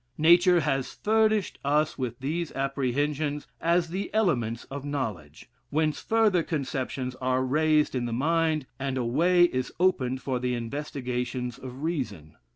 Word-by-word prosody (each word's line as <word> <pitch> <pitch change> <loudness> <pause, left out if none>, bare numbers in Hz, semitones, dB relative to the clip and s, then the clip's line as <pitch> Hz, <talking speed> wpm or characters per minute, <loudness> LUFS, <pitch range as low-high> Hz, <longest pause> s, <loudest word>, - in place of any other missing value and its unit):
Nature 175 +2 +6
has 135 -4 -1
furnished 215 -2 +1
us 150 +2 +1
with 125 -3 -4
these 160 +5 -2
apprehensions, 140 +2 -1 0.2
as 170 0 +2
the 190 +4 -4
elements 120 - +1
of 140 0 -7
knowledge, 105 - -5 0.2
whence 155 0 0
further 220 -5 +3
conceptions 135 -5 -3
are 130 0 0
raised 155 +2 +2
in 125 -2 -1
the 120 - -3
mind, 155 +3 +1
and 135 -1 -2
a 125 - -1
way 175 +9 +4
is 130 -7 +1
opened 130 -9 +2
for 130 -2 -2
the 125 0 -1
investigations 125 -1 -4
of 130 +2 -8
reason. 110 - -3
140 Hz, 145 wpm, -27 LUFS, 125-165 Hz, 0.2 s, Nature